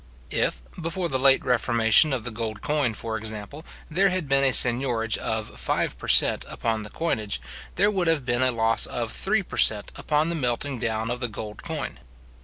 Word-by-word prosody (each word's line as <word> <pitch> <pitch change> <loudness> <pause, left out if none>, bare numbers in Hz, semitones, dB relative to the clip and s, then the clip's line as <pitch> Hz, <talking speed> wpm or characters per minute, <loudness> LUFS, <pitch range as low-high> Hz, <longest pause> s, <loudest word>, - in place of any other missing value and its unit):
If, 60 - -1 0.2
before 170 +2 -2
the 130 -3 -1
late 135 0 +4
reformation 115 +2 +4
of 130 -4 -2
the 125 - -5
gold 110 -1 -5
coin, 145 -7 0
for 110 0 -4
example, 110 +7 -7 0.2
there 190 +5 +2
had 185 -4 -2
been 135 0 +3
a 135 - +4
seignorage 120 -3 +3
of 110 -1 -4
five - - -1
per - - -8
cent. - - +5
upon 110 -1 -2
the 105 - -8
coinage, 110 -11 -3 0.4
there 205 +1 +3
would 185 -4 -1
have 160 -5 +1
been 120 0 0
a 130 - +4
loss 115 -1 +1
of 120 -2 -3
three 205 +1 0
per - - -9
cent. 105 -2 +3
upon 155 +2 0
the 170 - -2
melting 125 -1 -2
down 110 0 -2
of 125 - -3
the 120 - -1
gold 105 -1 -8
coin. - - -5
125 Hz, 200 wpm, -25 LUFS, 110-150 Hz, 0.4 s, cent